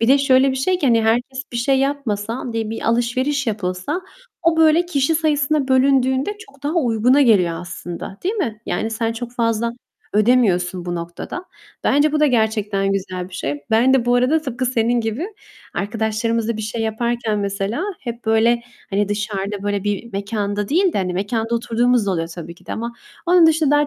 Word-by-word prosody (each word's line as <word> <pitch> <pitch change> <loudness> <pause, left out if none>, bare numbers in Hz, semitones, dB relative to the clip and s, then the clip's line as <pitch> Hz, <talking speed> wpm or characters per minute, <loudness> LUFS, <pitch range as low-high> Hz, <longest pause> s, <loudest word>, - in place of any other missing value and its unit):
bir 230 - +2
de 275 +2 +6
şöyle 270 -1 +4
bir 260 - -2
şey 360 +8 +1
ki, 295 - 0
hani, 230 -3 +4
herkes 245 +4 0
bir - - -3
şey 265 +3 +2
yapmasa, 250 -4 -2
di 225 -1 -2
bir 225 - -5
alışveriş 255 +4 0
yapılsa 200 - -2 0.4
o 335 -1 +3
böyle 325 +2 +4
kişi 300 -2 +1
sayısına 300 -2 +1
bölündüğünde 265 +6 +2
çok 280 -10 -16
daha 295 +4 -1
uyguna 250 -2 +3
geliyor 180 -9 +3
aslında, 175 +2 -7
değil 385 +5 0
mi? 230 - -2
Yani 225 - -1
sen 225 0 -1
çok 235 +1 -6
fazla 230 -1 0 0.4
ödemiyorsun 200 -6 +2
bu 175 -1 -3
noktada. 170 - -6 0.4
Bence 290 +2 +3
bu 305 - +1
da 300 - +5
gerçekten 215 -5 +1
güzel 185 -2 -3
bir 185 - -13
şey. 145 -4 -3
Ben 240 +4 +4
de 255 -3 +2
bu 245 0 +3
arada 255 +6 +3
tıpkı 255 -2 -2
senin 240 -1 +1
gibi 225 - -2 0.5
arkadaşlarımızla 220 +2 -1
bir 220 - -4
şey 220 +2 -4
yaparken 225 -1 -1
mesela 200 - -2 0.2
hep, 235 -1 -6
böyle, 225 +2 +3 0.3
hani, 200 0 +1
dışarıda 205 -1 -3
böyle 205 -1 -1
bir 205 +3 -3
mekanda 205 0 -2
değil 360 +4 +3
de, - - -1
hani, 185 -2 -1
-mekanda 220 +5 -1
oturduğumuz 235 -1 +1
da - - +1
oluyor 165 -3 -1
tabii 170 0 -8
ki - - -23
de - - -4
ama 235 +1 -4 0.3
onun 350 -1 +6
dışında 315 -2 +3
daha 295 0 +3
230 Hz, 185 wpm, -20 LUFS, 205-270 Hz, 0.5 s, de